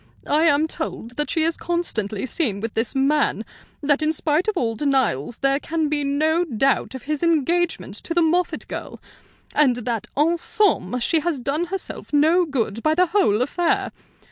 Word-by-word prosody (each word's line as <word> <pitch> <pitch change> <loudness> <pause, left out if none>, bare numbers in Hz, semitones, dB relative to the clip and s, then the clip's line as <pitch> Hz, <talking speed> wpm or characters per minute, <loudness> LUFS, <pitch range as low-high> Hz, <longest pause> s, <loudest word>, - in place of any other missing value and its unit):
I 310 +3 +2
am 300 0 +3
told 245 -7 -5
that 295 - -1
she 320 - +2
is 330 +1 +2
constantly 225 - -2
seen 240 - -1
with 225 +1 -4
this 225 +3 -1
man; 275 +3 +1 0.4
that 290 +1 +2
in 310 0 +2
spite 315 +3 0
of 430 -3 0
all 230 -6 0
denials 245 - 0
there 275 +1 +1
can 320 -1 -2
be 295 -1 +1
no 310 +4 +1
doubt 270 -2 0
of 260 - -8
his 300 0 -2
engagement 335 +1 +1
to 335 - -3
the 345 - +4
Moffatt 350 +3 0
girl; - - -7 0.5
and 275 -5 +4
that 235 -2 -3
en 330 +4 +2
somme 285 - +1
she 320 +7 +2
has 325 -1 -1
done 280 +6 -1
herself 380 +2 -6
no 320 +5 +4
good 230 -7 -2
by 310 +3 +2
the 365 +2 +4
whole 245 - +3
affair. 340 +6 0
295 Hz, 180 wpm, -22 LUFS, 250-330 Hz, 0.5 s, the